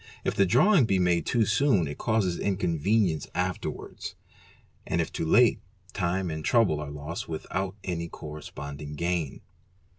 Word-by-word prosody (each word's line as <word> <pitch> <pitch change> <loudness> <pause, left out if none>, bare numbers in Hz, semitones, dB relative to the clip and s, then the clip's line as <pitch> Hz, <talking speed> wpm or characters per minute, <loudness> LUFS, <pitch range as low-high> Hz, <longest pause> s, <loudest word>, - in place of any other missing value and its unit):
If - - 0
the 100 - +3
drawing 150 - +5
be 100 -4 +2
made 90 -2 +2
too 115 -3 +3
soon 105 - +3
it 70 - -7
causes 105 -6 +1
inconvenience 90 -2 +1
afterwards, 90 0 -3 0.7
and 85 - 0
if 85 - -1
too 80 - -2
late, 120 +6 +5 0.3
time 90 -1 -1
and 80 0 -4
trouble 105 - +3
are 75 -1 -5
lost 75 +4 -6
without 95 +4 -3
any 85 -2 -3
corres 75 -1 -8
ponding 70 +1 -7
gain. 85 -2 -2
90 Hz, 150 wpm, -27 LUFS, 80-100 Hz, 0.7 s, drawing